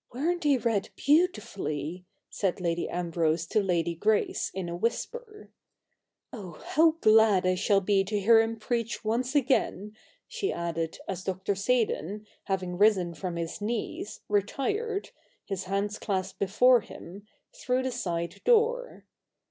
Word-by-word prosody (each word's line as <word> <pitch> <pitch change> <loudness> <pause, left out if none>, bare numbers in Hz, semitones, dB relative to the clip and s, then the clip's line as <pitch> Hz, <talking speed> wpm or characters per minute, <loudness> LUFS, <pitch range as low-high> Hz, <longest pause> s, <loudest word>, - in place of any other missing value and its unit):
' - - -39
Weren't 340 +6 0
they 290 -3 +3
read 225 -4 -1
beautifully 195 - 0
I - - -49 0.2
' - - -59
said 195 -3 -1
Lady 170 -1 -1
Ambrose 165 -2 0
to 215 - +1
Lady 170 -3 0
Grace 210 +6 0
in 185 -2 -4
a 170 - -4
whisper. 420 - -4 0.4
' - - -55
Oh, 190 -7 -8 0.2
how 320 +1 +5
glad 215 -4 +5
I 185 - +3
shall 195 +2 +2
be 195 0 +2
to 205 +1 -1
hear 225 +3 +6
him 225 0 -2
preach 230 0 -3
once 245 +5 -1
again! 240 -6 +1 0.2
' - - -38
she 475 -5 -2
added, 165 -1 -3
as 185 -1 -4
Dr. 190 +2 -1
Seydon, 210 -2 -1 0.2
having 185 -2 -2
risen 195 -5 +4
from 170 +2 -5
his 170 +3 -4
knees, 215 -1 -4
retired, 400 - -1 0.3
his 195 -2 -4
hands 200 +2 -2
clasped 190 -3 -3
before 235 +5 +4
him, 200 +1 -11 0.3
through 255 +1 -1
the 260 - -1
side 170 -8 -3
door. 485 +2 +2
205 Hz, 155 wpm, -28 LUFS, 180-245 Hz, 0.4 s, hear